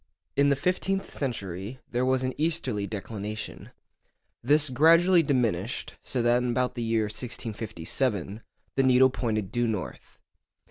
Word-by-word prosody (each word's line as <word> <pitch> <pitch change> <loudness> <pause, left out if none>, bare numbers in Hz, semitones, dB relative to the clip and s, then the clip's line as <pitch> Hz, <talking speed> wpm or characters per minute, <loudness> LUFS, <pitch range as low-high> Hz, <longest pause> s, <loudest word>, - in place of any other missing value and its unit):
In 140 0 +4
the 140 - +4
fifteenth 185 +5 -1
century 100 - -4
there 125 +1 0
was 130 0 +2
an 130 0 -1
easterly 140 -10 0
declination. 105 0 -6 0.7
This 145 +2 +3
gradually 165 +6 +5
diminished, 120 - -1
so 125 -3 -2
that 120 +1 +3
in 125 - -1
about 125 +1 0
the 120 - -5
year 115 -1 +1
1657 110 -2 -3 0.3
the 135 - +3
needle 130 0 +5
pointed 110 -6 -2
due 120 0 +1
north. 105 -5 -5
120 Hz, 135 wpm, -27 LUFS, 110-135 Hz, 0.7 s, gradually